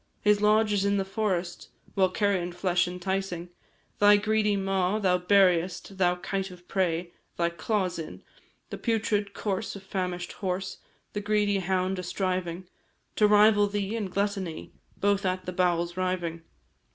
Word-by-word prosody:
His 210 0 +3
lodge 210 0 +4
is 200 -1 +1
in 200 0 +2
the 195 - 0
forest; 190 -4 -2 0.2
While 190 -2 +3
carion 185 -3 0
flesh 180 0 +1
enticing 180 -1 -3 0.5
Thy 205 0 +7
greedy 210 0 +1
maw, 195 0 0
thou 185 -4 +2
buriest 180 -1 +2
Thou 180 -1 +3
kite 195 +2 -3
of 180 -1 -14
prey! 175 -2 -1 0.2
thy 170 0 +1
claws 185 0 -1
in 160 - -8 0.5
The - - -5
putrid 210 -3 0
corse 205 +1 -3
of 200 - -9
famish'd 180 -2 -3
horse, 190 -1 -4 0.3
The 205 - -2
greedy 205 -1 +1
hound 185 0 0
a - - -2
striving 180 -1 -2 0.5
To 210 - +5
rival 210 0 +5
thee 205 +1 -2
in 215 -4 -2
gluttony, 195 -3 -3 0.2
Both 200 0 +1
at 185 -1 -1
the 180 - -4
bowels 175 -1 +1
riving. 180 -3 -2
190 Hz, 150 wpm, -27 LUFS, 180-205 Hz, 0.5 s, Thy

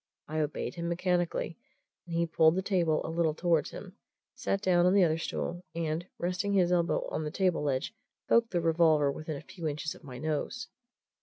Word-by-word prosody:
I 155 +1 -2
obeyed 150 -1 -2
him 170 -1 -3
mechanically, 175 -1 -1 0.5
and 170 - -4
he 170 0 +2
pulled 160 0 +4
the 190 - 0
table 170 -6 +1
a - - -4
little 165 -2 +1
towards 165 -3 +2
him, 195 +1 -10 0.4
sat 195 - -1
down 180 -2 +3
on 185 - +4
the 200 - +6
other 160 -1 +2
stool, 175 +2 -3
and, 165 +1 -2
resting 180 +3 -1
his 180 -3 +3
elbow 175 -1 +1
on 155 - -2
the 150 - -2
table 180 +2 +1
ledge, 140 +5 -1 0.3
poked 230 0 +4
the 175 -4 0
revolver 160 -3 +4
within 155 +1 -5
a - - -8
few 170 -4 -6
inches 155 +1 -3
of - - -16
my 130 -4 -8
nose. 155 - -3
170 Hz, 200 wpm, -30 LUFS, 155-180 Hz, 0.5 s, the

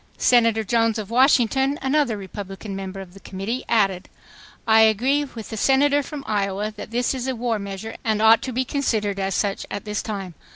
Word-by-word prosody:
Senator 230 -3 +3
Jones 225 +1 +1
of 215 -1 -6
Washington, 265 +2 +3
another 265 -4 +1
Republican 195 +1 -7
member 195 0 -6
of 180 -2 -12
the 195 - -13
Committee, 195 +7 -4
added: 195 -5 +1 0.6
"I 220 0 +6
agree 250 +7 +3
with 230 -5 -10
the 220 - -5
Senator 280 +5 +3
from 280 0 -7
Iowa 205 0 -1
that 210 - -8
this 240 +3 0
is 260 -1 -4
a 260 - -1
war 230 -2 -1
measure 200 +2 -6
and 220 -2 0
ought 220 +1 +6
to 260 - -4
be 255 +2 -1
considered 215 -8 -1
as 195 -1 -1
such 200 -2 -1
at 200 - -5
this 210 -1 -2
time. 195 -4 -5
220 Hz, 195 wpm, -22 LUFS, 200-255 Hz, 0.6 s, I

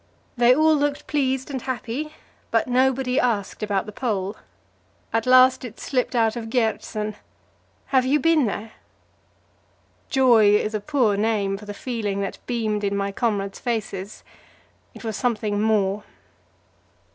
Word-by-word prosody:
They 245 0 +5
all 315 +2 +4
looked 290 -1 -1
pleased 265 -2 -1
and 265 -2 -3
happy, 265 +4 -4 0.3
but 225 +1 +1
nobody 255 +1 +2
asked 220 -7 -1
about 205 -2 -1
the 215 - -7
Pole. 205 -3 -2 0.8
At 225 +1 0
last 255 +1 +6
it 230 -3 -8
slipped 255 -1 -1
out 225 -1 +2
of 225 -2 -5
Gjertsen: 220 -3 -1 0.8
"Have 260 -1 +5
you 275 +4 +2
been 315 -3 +3
there?" 215 +2 -5 1.4
Joy 235 -6 +5
is 215 +1 0
a 215 - 0
poor 230 -2 +1
name 205 -2 0
for 205 +1 -10
the 205 - -6
feeling 210 -5 -3
that 195 - -4
beamed 220 -4 -1
in 200 0 0
my 200 0 -1
comrades' 200 -3 -2
faces; 215 -4 -4 0.7
it - - -11
was 220 -2 -3
something 215 -4 -1
more. 210 -2 +1
225 Hz, 145 wpm, -23 LUFS, 205-255 Hz, 1.4 s, last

